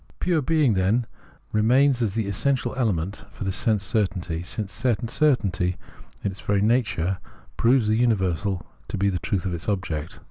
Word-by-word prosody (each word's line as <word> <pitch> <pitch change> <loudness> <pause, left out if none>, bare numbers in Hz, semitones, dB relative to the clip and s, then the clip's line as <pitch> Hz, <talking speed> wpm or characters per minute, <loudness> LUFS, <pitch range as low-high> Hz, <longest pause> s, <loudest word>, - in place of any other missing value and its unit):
Pure 175 -4 +1
being, 145 -3 +3
then, 100 +6 +2 0.5
remains 125 +4 +3
as 105 -5 0
the 110 -2 0
essential 130 +7 0
element 100 -6 -1
for - - -8
this 95 -1 -1
sense 105 -3 +1
certainty, 95 -5 -1
since 100 +3 -4
sense 120 -1 -1
certainty 100 - +2 0.5
in 100 - 0
its 95 - -9
very 100 -1 +1
nature 100 -5 +1 0.4
proves 120 -1 +3
the 110 +1 +2
universal 95 -5 +1 0.2
to - - -4
be 100 +1 +2
the 90 -2 -1
truth 95 +1 -2
of 95 - -1
its 85 +4 -4
object. 85 -6 -3
105 Hz, 170 wpm, -24 LUFS, 95-120 Hz, 0.5 s, being